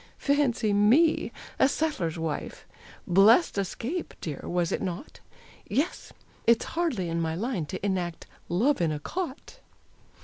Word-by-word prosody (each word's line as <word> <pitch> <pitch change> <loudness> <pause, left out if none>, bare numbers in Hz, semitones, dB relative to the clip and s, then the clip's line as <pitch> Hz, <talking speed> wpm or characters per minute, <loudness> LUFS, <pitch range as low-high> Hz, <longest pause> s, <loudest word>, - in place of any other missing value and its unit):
Fancy 275 -7 +1
me 235 +11 +4 0.3
a 265 - +5
settler's 275 - -1
wife! 160 -2 -4 0.4
Blest 205 - +5
escape, 240 - -4
dear, 150 -4 -5
was 175 -1 0
it - - -1
not? 185 - -5 0.5
Yes; 285 - -1 0.4
it's 230 -1 +4
hardly 315 - 0
in 165 0 -1
my 160 0 -1
line 195 - -2
To 185 +4 -5
enact 180 -4 -2 0.2
"Love 220 +9 +2
in 165 -2 +2
a 150 - -2
Cot." 355 - -5
205 Hz, 135 wpm, -27 LUFS, 175-280 Hz, 0.5 s, a